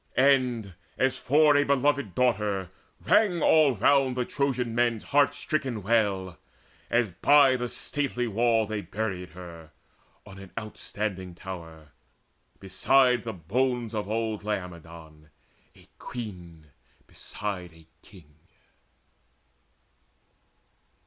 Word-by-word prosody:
And, 125 -7 +2 0.2
as 130 0 +1
for 150 +2 +4
a 145 - +4
beloved 140 -7 +1
daughter, 105 -7 0 0.3
rang 190 -2 +3
All 155 -5 +5
round 130 +3 +3
the 125 - 0
Trojan 130 -4 -1
men's 120 -2 +1
heart 145 0 +2
stricken 130 -9 -3
wail, 100 -4 0 0.5
As 120 -4 +1
by 140 - +5
the 125 -1 -3
stately 135 -4 -3
wall 115 +1 +2
they 105 0 -4
buried 95 -5 -4
her 85 -3 -11 0.6
On 95 0 -12
an 95 -1 -11
outstanding 100 -4 -5
tower, 80 -5 -9 0.7
beside 125 +6 +3
the 115 - -4
bones 120 +6 -1
Of 105 -2 -3
old 110 -1 -2
Laomedon, 85 -6 -7 0.5
a - - -20
queen 90 -10 -9 0.3
beside 95 -4 -6
A 80 0 -19 0.2
king. 85 -8 -18
110 Hz, 110 wpm, -27 LUFS, 95-130 Hz, 0.7 s, All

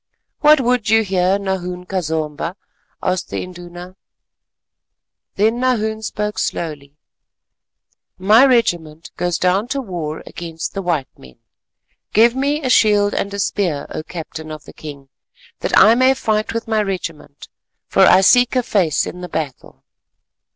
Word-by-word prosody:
"What 305 0 +6
would 245 -3 0
you 225 0 +4
here, 190 -1 +1
Nahoon 180 -2 -4
ka 185 0 -2
Zomba?" 160 +1 -3 0.5
asked 185 -1 -1
the - - -3
Induna. 175 0 -10 1.4
Then 220 +4 +1
Nahoon 220 -4 0
spoke 210 -1 -3
slowly. 145 -4 -4 1.2
"My 210 +6 +5
regiment 170 - +1
goes 175 -1 -1
down 190 +5 +1
to 275 +2 -2
war 170 - -5
against 165 -1 -6
the 195 - -3
white 165 -7 -1
men; 65 -2 -16 0.8
give 230 +3 +5
me 285 +3 -1
a 260 - -1
shield 205 -3 +4
and 200 - -2
a 200 - -5
spear, 180 -7 -1
O - - -4
Captain 160 -1 -8
of 155 -1 -8
the - - -13
king, 140 -3 -10 0.5
that - - +1
I 220 - +8
may 255 +2 +4
fight 215 -4 -1
with 230 +1 -4
my 220 -1 +1
regiment, 170 -7 -6 0.4
for - - -2
I 185 - +6
seek 245 +6 +4
a 250 - +2
face 180 -10 +1
in 180 - -7
the 180 - -7
battle." 145 -5 -6
190 Hz, 150 wpm, -19 LUFS, 165-220 Hz, 1.4 s, I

